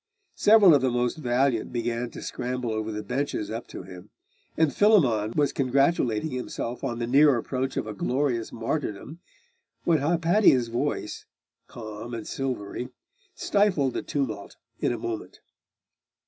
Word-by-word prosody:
Several 205 -5 +6
of 140 - +4
the 130 - +2
most 120 +2 0
valiant 125 -3 0
began 120 0 -2
to - - -9
scramble 125 -1 -3
over 110 0 -2
the 105 0 -4
benches 130 -1 -2
up 115 +2 -5
to - - -8
him; 90 -1 -12 0.5
and 160 -3 +3
Philammon 125 - +3
was 145 -2 +2
congratulating 135 -1 +1
himself 125 -1 -5
on 120 -4 -2
the 120 - -2
near 140 +2 +5
approach 130 +3 -3
of - - -1
a 110 - -5
glorious 125 +1 -1
martyrdom, 125 +4 -4 0.6
when 165 -3 +3
Hypatia's 165 - +3
voice, 120 +1 -3 0.4
calm 110 +1 -7
and 115 - -6
silvery, 125 -2 -4 0.5
stifled 185 - +1
the - - -2
tumult 115 -8 -3 0.2
in - - +1
a 120 - -2
moment. 110 -1 -6
125 Hz, 145 wpm, -26 LUFS, 115-145 Hz, 0.6 s, Several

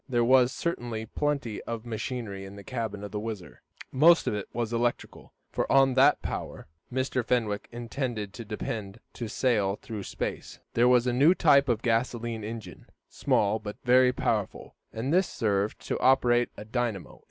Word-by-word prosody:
There 120 -2 +2
was 130 0 +5
certainly 120 -10 -3
plenty 140 -3 -2
of 115 0 -5
machinery 110 -3 -4
in 95 +1 -10
the 100 - -10
cabin 110 -3 -4
of 105 - -7
the 105 - -3
WHIZZER. 105 -5 -7 0.3
Most 165 +5 +5
of - - 0
it 105 -1 -4
was 120 -1 -3
electrical, 120 +1 -2 0.2
for - - -2
on 135 -1 +5
that 130 +2 +4
power - - -5 0.3
Mr. 130 0 -1
Fenwick 115 -4 -1
intended 120 -3 -4
to 115 - -7
depend 105 -1 -5
to 120 - -5
sail 105 -4 +1
through 110 -3 -6
space. - - -5 0.2
There 120 +1 +4
was 125 -1 +4
a 125 - +1
new 145 +8 +5
type 140 -6 +4
of 115 -1 0
gasolene 115 -1 -1
engine, 110 +1 -8 0.2
small 105 +2 +1
but 105 -1 -7
very 125 +1 +5
powerful, - - -2 0.2
and 125 +7 -2
this 185 +1 +3
served 105 -2 -1
to - - -2
operate 120 -2 +3
a 105 - -8
dynamo. 115 -4 -3
120 Hz, 170 wpm, -28 LUFS, 105-125 Hz, 0.3 s, was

